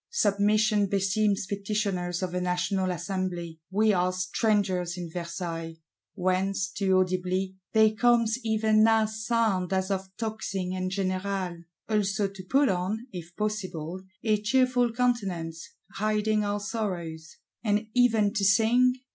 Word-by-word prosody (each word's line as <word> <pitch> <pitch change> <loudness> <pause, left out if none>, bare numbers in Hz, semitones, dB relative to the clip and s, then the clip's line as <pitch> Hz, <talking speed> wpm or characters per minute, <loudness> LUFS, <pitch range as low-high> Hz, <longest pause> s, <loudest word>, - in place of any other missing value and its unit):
Submission 210 - +2
beseems 200 +1 +1
petitioners 195 -3 -2
of 180 -1 -3
a 180 - -1
National 180 +1 0
Assembly; 180 -2 -3
we 210 +2 +3
are 180 0 +2
strangers 185 -1 0
in 175 -2 -6
Versailles,—whence, 180 +3 -3
too 190 -2 +1
audibly, 185 +1 0 0.2
there 220 -1 +5
comes 230 +1 +2
even 220 -1 +3
now 225 0 +4
sound 220 -4 0
as 190 +1 0
of 190 0 -2
tocsin 205 -5 -3
and 185 0 -2
générale! 185 -2 -2 0.2
Also 205 -2 +1
to 195 -1 -10
put 275 +7 +3
on, 195 +5 -1
if 175 -2 -9
possible, 185 -5 -3 0.2
a 215 -2 +2
cheerful 245 +1 +2
countenance, 195 -10 -1 0.2
hiding 215 +1 0
our 205 0 -1
sorrows; 175 -7 -4 0.3
and 210 0 +1
even 225 -5 +3
to 210 -4 -1
sing? 230 +6 +4
195 Hz, 125 wpm, -27 LUFS, 185-215 Hz, 0.3 s, there